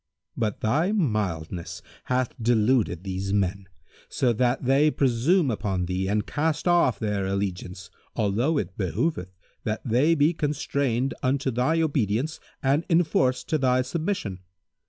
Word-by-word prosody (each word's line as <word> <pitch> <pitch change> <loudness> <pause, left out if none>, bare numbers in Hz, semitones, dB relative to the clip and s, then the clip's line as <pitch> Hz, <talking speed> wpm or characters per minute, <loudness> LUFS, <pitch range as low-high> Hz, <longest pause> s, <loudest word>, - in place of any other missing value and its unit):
But 110 -3 -2
thy 155 - +1
mildness 95 - -2 0.2
hath 125 -1 0
deluded 110 -5 +2
these 95 0 -3
men, 100 -1 0 0.4
so 125 -2 +1
that 125 +3 0
they 140 +4 +4
presume 140 +4 +2
upon 95 -4 -2
thee 95 +1 -2
and 105 +1 0
cast 155 +3 -1
off 170 - +3
their 100 -2 -1
allegiance, 95 -2 -4 0.2
although 115 +8 +1
it 95 - -3
behoveth 95 - -2 0.3
that 110 0 -3
they 135 +8 +3
be 150 +2 +3
constrained 140 -4 -1
unto 130 +1 0
thy 125 +8 +1
obedience 135 - 0 0.2
and 140 +4 +2
enforced 155 -7 +2
to 155 - +1
thy 130 -1 +2
submission. 155 - -3
125 Hz, 135 wpm, -25 LUFS, 100-145 Hz, 0.4 s, they